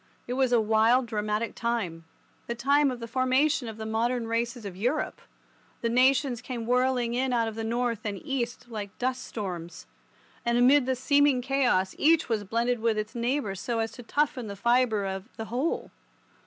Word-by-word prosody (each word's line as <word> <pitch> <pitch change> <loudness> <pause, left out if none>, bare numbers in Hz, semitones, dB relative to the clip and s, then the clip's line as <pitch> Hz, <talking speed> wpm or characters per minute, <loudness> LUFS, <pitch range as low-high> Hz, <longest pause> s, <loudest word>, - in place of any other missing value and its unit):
It 245 - -4
was 260 -1 +1
a 240 - +5
wild, 225 +3 +3
dramatic 215 0 -2
time—the 215 -1 -5
time 280 +4 +3
of 250 -2 -4
the 230 - -6
formation 255 +2 +1
of 220 -1 -7
the 220 - -6
modern 230 +2 0
races 230 0 -2
of 195 -3 -6
Europe. 245 +10 -1 0.6
The 230 - 0
nations 255 0 +3
came 245 -3 -5
whirling 250 -1 +1
in 255 +1 0
out 230 -2 +1
of 225 - -4
the 225 +1 -5
north 235 0 -1
and 205 -2 -3
east 250 -4 -3
like 210 -4 -7
dust 255 0 -1
storms, 175 -8 -6 0.6
and 235 0 +1
amid 255 +2 +5
the 260 - +1
seeming 285 +1 +3
chaos 245 -8 +1
each 320 -2 +4
was 220 -3 0
blended 235 +4 0
with 225 -1 +1
its 215 0 -3
neighbour 240 -2 -1
so 230 +5 -3
as 225 0 -1
to 245 - -10
toughen 275 -1 -1
the 200 - -6
fibre 235 -1 +2
of 190 0 -4
the 225 - -4
whole. 255 +9 -2
235 Hz, 180 wpm, -27 LUFS, 220-255 Hz, 0.6 s, a